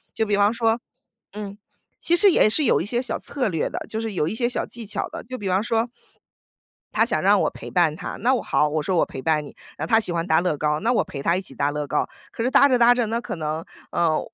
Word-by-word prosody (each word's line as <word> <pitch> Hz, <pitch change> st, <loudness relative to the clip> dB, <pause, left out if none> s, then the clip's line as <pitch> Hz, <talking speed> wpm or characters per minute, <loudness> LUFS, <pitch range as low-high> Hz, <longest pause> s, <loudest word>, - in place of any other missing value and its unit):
就 220 Hz, -, +1 dB
比 205 Hz, -1 st, +1 dB
方 205 Hz, +1 st, +4 dB
说 230 Hz, 0 st, +1 dB, 0.5 s
嗯， 205 Hz, -1 st, -7 dB, 0.4 s
其 345 Hz, -, +2 dB
实 390 Hz, +3 st, +6 dB
也 215 Hz, -, +4 dB
是 295 Hz, +7 st, +2 dB
有 220 Hz, -, +3 dB
一 -, -, -5 dB
些 240 Hz, +4 st, 0 dB
小 255 Hz, -, -2 dB
策 260 Hz, -6 st, -2 dB
略 165 Hz, -4 st, -1 dB
的， -, -, -4 dB
就 220 Hz, -, -4 dB
是 225 Hz, -1 st, -3 dB
有 160 Hz, -4 st, 0 dB
一 -, -, -3 dB
些 240 Hz, +1 st, 0 dB
小 245 Hz, -, -2 dB
技 235 Hz, -1 st, -7 dB
巧 210 Hz, -, -3 dB
的， -, -, -8 dB
就 255 Hz, +2 st, -7 dB
比 200 Hz, -2 st, -4 dB
方 190 Hz, +4 st, +1 dB
说 230 Hz, +1 st, 0 dB, 1.1 s
她 -, -, +3 dB
想 -, -, -1 dB
让 -, -, +4 dB
我 -, -, +2 dB
陪 -, -, -10 dB
伴 170 Hz, -4 st, +2 dB
她， 180 Hz, -, -6 dB
那 250 Hz, +3 st, +3 dB
我 250 Hz, -, 0 dB
好， 150 Hz, -, +1 dB
我 155 Hz, +1 st, -1 dB
说： 180 Hz, +4 st, 0 dB
“我 -, -, +3 dB
陪 130 Hz, -, -8 dB
伴 155 Hz, -1 st, +1 dB
你。” -, -, -12 dB, 0.2 s
然 155 Hz, -, -3 dB
后 -, -, -10 dB
她 225 Hz, -, +6 dB
喜 195 Hz, -, -2 dB
欢 170 Hz, -1 st, -1 dB
搭 160 Hz, -2 st, +3 dB
乐 175 Hz, -5 st, 0 dB
高， 150 Hz, 0 st, 0 dB
那 230 Hz, +4 st, +1 dB
我 245 Hz, -, +2 dB
陪 140 Hz, -, -7 dB
她 170 Hz, +4 st, +2 dB
一 -, -, -2 dB
起 140 Hz, -8 st, -9 dB
搭 140 Hz, +3 st, 0 dB
乐 150 Hz, -1 st, -3 dB
高。 150 Hz, -, 0 dB, 0.2 s
可 230 Hz, -, -4 dB
是 255 Hz, -, 0 dB
搭 280 Hz, -, +6 dB
着 255 Hz, -, +3 dB
搭 240 Hz, 0 st, +6 dB
着 245 Hz, -1 st, 0 dB
呢， 230 Hz, +2 st, -1 dB
可 -, -, -5 dB
能， 155 Hz, +1 st, -3 dB, 0.3 s
呃， 165 Hz, -2 st, +2 dB
205 Hz, 300 characters per minute, -23 LUFS, 160-235 Hz, 1.1 s, 实